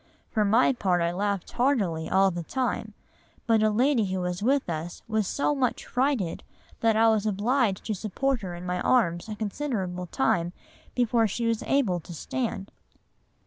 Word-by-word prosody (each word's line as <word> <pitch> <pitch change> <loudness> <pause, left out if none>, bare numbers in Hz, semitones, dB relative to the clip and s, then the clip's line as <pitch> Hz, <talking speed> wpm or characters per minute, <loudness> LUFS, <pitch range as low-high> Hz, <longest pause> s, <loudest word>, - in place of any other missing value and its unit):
For 215 - +2
my 225 +6 +4
part 185 -7 +1
I 170 0 +1
laughed 200 +1 -2
heartily 205 - 0
all 190 0 +4
the 175 0 -4
time, 255 +10 -2 0.5
but 225 -2 +3
a 215 - +4
lady 240 +1 +2
who 185 0 -2
was 180 +1 -3
with 270 +5 +2
us 170 +1 -5
was 215 -2 0
so 285 +6 0
much 260 -4 -1
frighted, 250 - 0 0.4
that 225 -1 +3
I 225 +1 +5
was 220 -1 +2
obliged 215 0 +1
to 220 - -1
support 230 +6 -1
her 180 -3 -5
in 175 +1 -8
my 180 0 -2
arms 175 -7 +2
a 215 - -4
considerable 205 -5 -3
time 170 +5 0 0.4
before 235 -2 +3
she 235 +4 -3
was 230 -1 0
able 230 -11 +1
to 170 +1 -10
stand." 215 0 -3
210 Hz, 175 wpm, -27 LUFS, 180-245 Hz, 0.5 s, I